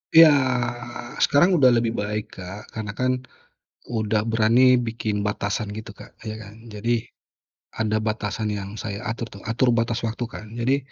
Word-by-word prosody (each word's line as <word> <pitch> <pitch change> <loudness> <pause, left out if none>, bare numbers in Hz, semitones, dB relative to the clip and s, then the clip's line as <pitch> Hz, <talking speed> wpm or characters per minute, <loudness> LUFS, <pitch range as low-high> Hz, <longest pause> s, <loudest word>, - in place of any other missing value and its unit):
Iya, 160 -2 +10 0.9
sekarang 175 +7 +5
udah 130 - +7
lebih 115 -2 +3
baik 105 -2 -4
Kak 95 +3 -8
karena 105 -2 -5
kan 130 0 +1 0.8
udah 110 -1 +1
berani 115 +3 +5
bikin 110 -3 -2
batasan 105 +1 -2
gitu 110 -1 -7
Kak, - - -14
ya 110 -1 -5
kan. 110 +2 -12
Jadi 115 +2 0 0.7
ada 110 -1 0
batasan 105 -1 -2
yang 100 +1 -6
saya 105 0 -5
atur, 115 +1 -3
tau 100 - -11
atur 120 +1 +3
batas 115 0 +1
waktu 115 +2 -3
kan 105 - -8
jadi, 130 +4 +2
110 Hz, 155 wpm, -24 LUFS, 105-120 Hz, 0.9 s, Iya